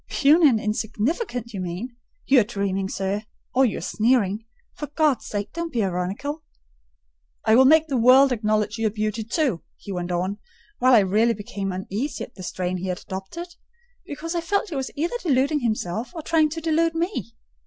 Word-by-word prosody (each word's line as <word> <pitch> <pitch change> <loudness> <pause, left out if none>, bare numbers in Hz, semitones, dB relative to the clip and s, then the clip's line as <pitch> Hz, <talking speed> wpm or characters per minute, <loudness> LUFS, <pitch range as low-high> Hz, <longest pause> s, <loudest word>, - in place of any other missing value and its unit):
"Puny 305 +2 +5
and 230 -4 +2
insignificant, 225 - -2
you 195 - -4
mean. 185 +8 -5 0.3
You 270 -1 +6
are - - +4
dreaming, 200 -3 -2
sir,—or 210 +7 -1
you 210 - -3
are - - -5
sneering. 220 +1 +1 0.3
For 295 - -6
God's 295 -3 +1
sake, 205 -1 -4
don't 335 0 -4
be 230 -5 0
ironical!" 195 - -3 1.0
"I 220 - +4
will 260 +2 +7
make 315 +3 +6
the 275 -5 -1
world 260 +3 +7
acknowledge 215 -1 0
you 225 - +2
a - - +2
beauty, 215 +1 -2
too," 235 - 0 0.2
he 200 - -9
went 180 -1 -3
on, 185 +4 -1 0.4
while 255 0 +6
I 220 - +7
really 215 +5 +2
became 200 -1 -4
uneasy 200 +9 -3
at - - -10
the - - -11
strain 185 0 -3
he 185 +1 -4
had 180 -1 -2
adopted, 195 - -7 0.5
because 330 +4 -5
I 340 - 0
felt 400 +5 0
he 320 - -5
was 265 -1 -2
either 340 +11 -1
deluding 285 -1 +2
himself 220 - -2
or 325 - -5
trying 315 -1 +3
to 325 +2 -5
delude 330 +1 +1
me. 330 - -3
230 Hz, 185 wpm, -24 LUFS, 200-295 Hz, 1.0 s, will